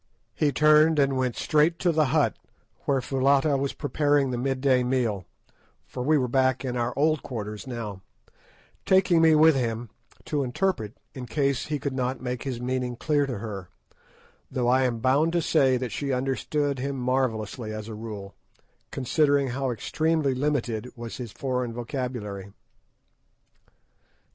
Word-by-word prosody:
He 150 -2 +1
turned 155 +2 +5
and 135 -1 +3
went 130 -2 0
straight 155 +2 +2
to 175 - +2
the 155 -1 +3
hut 145 +2 +2 0.5
where 135 -2 +1
Foulata 135 +3 +2
was 140 0 -1
preparing 145 -2 +1
the 125 - -2
mid 135 +1 -1
day 130 -2 +3
meal, 120 -7 0 0.6
for - - -7
we 150 +5 +3
were 130 -3 +1
back 130 +1 +1
in 125 -1 -2
our 120 0 0
old 155 +1 +2
quarters 105 -2 -6
now, 110 -6 -5 0.8
taking 185 -3 +4
me 160 -1 +6
with 160 +1 +6
him 115 -4 -2 0.3
to 150 -3 -1
interpret 125 - -1 0.2
in 125 -2 -7
case 140 0 0
he 150 -1 -1
could 140 -1 -3
not 130 0 -2
make 125 -1 -4
his 130 -4 -4
meaning 125 0 -2
clear 145 +2 +1
to 125 -4 -3
her, 100 -4 -6 0.8
though 125 -2 0
I 130 +1 +4
am 120 -3 -1
bound 140 +6 +3
to 175 - +3
say 135 -5 +3
that 125 -2 -4
she 140 -1 -2
understood 135 +2 -1
him 140 +2 -2
marvellously 125 -3 -1
as 110 0 -6
a 115 - -6
rule, 105 -3 -7 0.6
considering 140 +1 +1
how 135 +2 -2
extremely 155 +4 0
limited 125 -4 -1
was 120 -1 -7
his 120 -4 -6
foreign 125 +1 -2
vocabulary. 115 -5 -5
130 Hz, 160 wpm, -26 LUFS, 120-145 Hz, 0.8 s, me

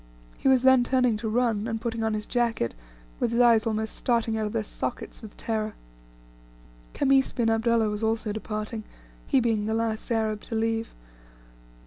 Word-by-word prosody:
He - - -1
was 260 -1 +5
then 260 -1 +6
turning 250 -2 +2
to 220 0 -3
run, 225 -2 +1
and 225 -1 -2
putting 230 -1 -3
on 220 -1 0
his 210 0 -4
jacket, 235 - 0 0.5
with 230 - 0
his 235 - +1
eyes 230 -2 +5
almost 220 0 -2
starting 230 -2 0
out 215 -1 -1
of - - -5
their 225 -1 -1
sockets 225 - -5
with 220 -3 -11
terror. 215 -1 -2 1.2
Khamis 270 -1 +3
bin 230 -3 +1
Abdullah 225 0 +2
was 210 +1 -4
also 220 -1 0
about - - -3
departing, 215 +1 -4 0.4
he 270 - +4
being 225 -3 0
the 220 - 0
last 225 +1 -2
Arab 220 -2 0
to 225 - -5
leave. 225 0 -1
225 Hz, 180 wpm, -26 LUFS, 220-235 Hz, 1.2 s, then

